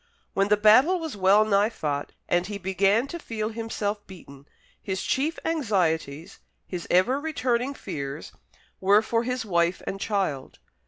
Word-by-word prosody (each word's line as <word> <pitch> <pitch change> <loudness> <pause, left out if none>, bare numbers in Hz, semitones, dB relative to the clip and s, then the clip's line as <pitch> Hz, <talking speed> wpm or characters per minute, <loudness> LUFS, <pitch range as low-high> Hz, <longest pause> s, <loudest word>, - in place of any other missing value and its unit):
When 195 0 +2
the 210 0 +3
battle 250 - +5
was 320 -6 -5
well 200 +2 +4
nigh 205 0 +3
fought, 150 -10 -3 0.2
and 175 +1 +1
he 205 -1 -5
began 195 +4 +2
to 340 +5 -7
feel 220 -7 -4
himself 215 -2 -4
beaten; 145 -7 -13 0.3
his 190 -1 -3
chief 300 +5 0
anxieties, 175 - -1 0.3
his 180 -2 -6
ever 215 +10 +3
returning 270 -4 -1
fears, 140 - -6 0.5
were 200 +3 +4
for 230 +1 0
his 250 0 -3
wife 170 -2 +1
and 195 - -5
child. 190 -11 -2
205 Hz, 150 wpm, -26 LUFS, 180-235 Hz, 0.5 s, battle